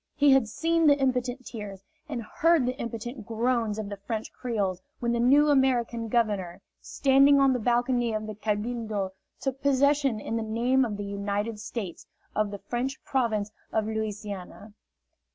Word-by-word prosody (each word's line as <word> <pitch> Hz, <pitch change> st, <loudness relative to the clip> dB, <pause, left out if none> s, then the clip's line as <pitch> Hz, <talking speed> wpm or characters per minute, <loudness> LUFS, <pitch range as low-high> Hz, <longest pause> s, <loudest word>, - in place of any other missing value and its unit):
He 290 Hz, -1 st, +5 dB
had 265 Hz, -4 st, +5 dB
seen 330 Hz, +7 st, +1 dB
the 285 Hz, -1 st, +6 dB
impotent 255 Hz, -1 st, -1 dB
tears 200 Hz, -4 st, -7 dB, 0.3 s
and 245 Hz, -5 st, -3 dB
heard 325 Hz, +5 st, +2 dB
the 250 Hz, +1 st, -1 dB
impotent 235 Hz, +1 st, -5 dB
groans 230 Hz, -1 st, 0 dB
of 215 Hz, -2 st, -4 dB
the 205 Hz, -, -6 dB
French 215 Hz, +2 st, -5 dB
Creoles 200 Hz, -7 st, -2 dB, 0.2 s
when 235 Hz, -1 st, 0 dB
the 235 Hz, -, 0 dB
new 280 Hz, +5 st, +5 dB
American 245 Hz, -4 st, +2 dB
governor, 210 Hz, -6 st, 0 dB, 0.2 s
standing 275 Hz, +1 st, +4 dB
on 270 Hz, -1 st, +5 dB
the 250 Hz, -, 0 dB
balcony 240 Hz, +1 st, +1 dB
of 215 Hz, 0 st, -2 dB
the 215 Hz, -, -5 dB
cabildo, 210 Hz, -1 st, -2 dB, 0.3 s
took 270 Hz, 0 st, -3 dB
possession, 280 Hz, -3 st, +3 dB
in 225 Hz, +2 st, -3 dB
the -, -, -1 dB
name 240 Hz, +4 st, +2 dB
of 210 Hz, -3 st, -4 dB
the 205 Hz, -, -4 dB
United 200 Hz, +2 st, -3 dB
States, 205 Hz, -4 st, -6 dB, 0.3 s
of 215 Hz, -1 st, +1 dB
the 200 Hz, -, -6 dB
French 255 Hz, +3 st, -3 dB
province 220 Hz, -6 st, 0 dB, 0.2 s
of 220 Hz, -1 st, +1 dB
Louisiana. 210 Hz, -2 st, -5 dB
235 Hz, 165 wpm, -27 LUFS, 210-260 Hz, 0.3 s, the